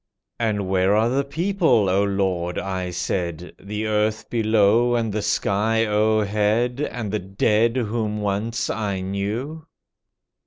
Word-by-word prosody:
"And 105 Hz, -4 st, -1 dB
where 95 Hz, +1 st, +2 dB
are 110 Hz, +2 st, +3 dB
the 135 Hz, +3 st, +1 dB
people, 160 Hz, -, +1 dB
O 95 Hz, +2 st, +2 dB
Lord," 95 Hz, -3 st, -1 dB
I 95 Hz, -1 st, -3 dB
said, 90 Hz, -1 st, -3 dB
"The 105 Hz, +2 st, -4 dB
earth 110 Hz, 0 st, -1 dB
below, 115 Hz, +1 st, +3 dB
and 115 Hz, -3 st, -1 dB
the 105 Hz, -, -1 dB
sky 110 Hz, +3 st, +1 dB
o'er 110 Hz, 0 st, +2 dB
head, 110 Hz, +5 st, 0 dB
And 120 Hz, -8 st, -3 dB
the 105 Hz, -, -1 dB
dead 105 Hz, +5 st, +1 dB
whom 110 Hz, -2 st, -2 dB
once 105 Hz, +4 st, -2 dB
I 100 Hz, -3 st, -2 dB
knew?" 110 Hz, +12 st, -4 dB
105 Hz, 140 wpm, -22 LUFS, 100-115 Hz, -, are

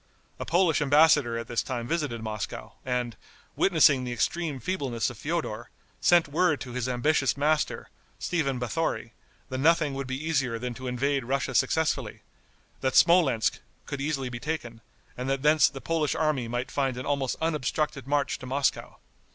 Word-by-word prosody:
A -, -, -4 dB
Polish 170 Hz, -3 st, +3 dB
embassador 145 Hz, -4 st, +4 dB
at 115 Hz, -, -5 dB
this 120 Hz, -, 0 dB
time 120 Hz, -3 st, -4 dB
visited 145 Hz, -8 st, -2 dB
Moscow, 105 Hz, -3 st, -5 dB
and, 125 Hz, -2 st, -2 dB, 0.4 s
witnessing 155 Hz, -7 st, +4 dB
the 125 Hz, -, -4 dB
extreme 145 Hz, +4 st, -1 dB
feebleness 125 Hz, -, -2 dB
of 120 Hz, -, -12 dB
Feodor, 145 Hz, -8 st, -3 dB, 0.3 s
sent 175 Hz, -3 st, +4 dB
word 155 Hz, +1 st, +2 dB
to 125 Hz, -, -6 dB
his 125 Hz, 0 st, -2 dB
ambitious 130 Hz, 0 st, +1 dB
master, 150 Hz, +2 st, 0 dB, 0.3 s
Stephen 145 Hz, -7 st, -1 dB
Bathori, 125 Hz, -1 st, -2 dB, 0.4 s
that 130 Hz, -1 st, -3 dB
nothing 155 Hz, -1 st, +3 dB
would 135 Hz, -1 st, -4 dB
be 130 Hz, 0 st, -3 dB
easier 140 Hz, -7 st, 0 dB
than 125 Hz, +1 st, -4 dB
to 130 Hz, +2 st, -7 dB
invade 135 Hz, +1 st, 0 dB
Russia 135 Hz, +1 st, -1 dB
successfully; 160 Hz, +3 st, 0 dB, 0.6 s
that 130 Hz, -1 st, -1 dB
Smolensk 170 Hz, -10 st, +4 dB, 0.3 s
could 140 Hz, -, -5 dB
easily 140 Hz, -3 st, -2 dB
be 120 Hz, -1 st, -6 dB
taken, 120 Hz, -6 st, -4 dB, 0.3 s
and 125 Hz, +2 st, -4 dB
that 135 Hz, 0 st, -1 dB
thence 150 Hz, -1 st, +5 dB
the 135 Hz, 0 st, -8 dB
Polish 160 Hz, -3 st, 0 dB
army 150 Hz, -6 st, 0 dB
might 120 Hz, +2 st, -3 dB
find 135 Hz, -3 st, -1 dB
an 125 Hz, -, -5 dB
almost 140 Hz, -3 st, 0 dB
unobstructed 150 Hz, -3 st, -1 dB
march 145 Hz, 0 st, 0 dB
to 130 Hz, -, -9 dB
Moscow. 135 Hz, +2 st, -1 dB
135 Hz, 165 wpm, -27 LUFS, 125-155 Hz, 0.6 s, thence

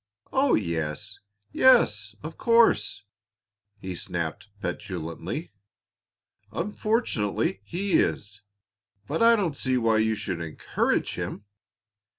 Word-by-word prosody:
"Oh, 270 Hz, +1 st, +4 dB
yes! 80 Hz, -6 st, -3 dB, 0.3 s
yes, 110 Hz, -, +4 dB
of 155 Hz, +2 st, -6 dB
course," 230 Hz, -, +3 dB, 0.8 s
he 95 Hz, -1 st, -5 dB
snapped 85 Hz, +2 st, -4 dB
petulantly. 90 Hz, -, -5 dB, 1.0 s
"Unfortunately 165 Hz, -, -1 dB
he 190 Hz, -, -3 dB
is, 105 Hz, 0 st, -1 dB, 0.7 s
but 155 Hz, -, -2 dB
I 230 Hz, 0 st, +7 dB
don't 180 Hz, -9 st, -1 dB
see 130 Hz, -2 st, 0 dB
why 115 Hz, -2 st, +3 dB
you 110 Hz, 0 st, +2 dB
should 90 Hz, -5 st, -4 dB
encourage 80 Hz, -2 st, -1 dB
him. 100 Hz, -, -5 dB
110 Hz, 100 wpm, -26 LUFS, -, 1.0 s, I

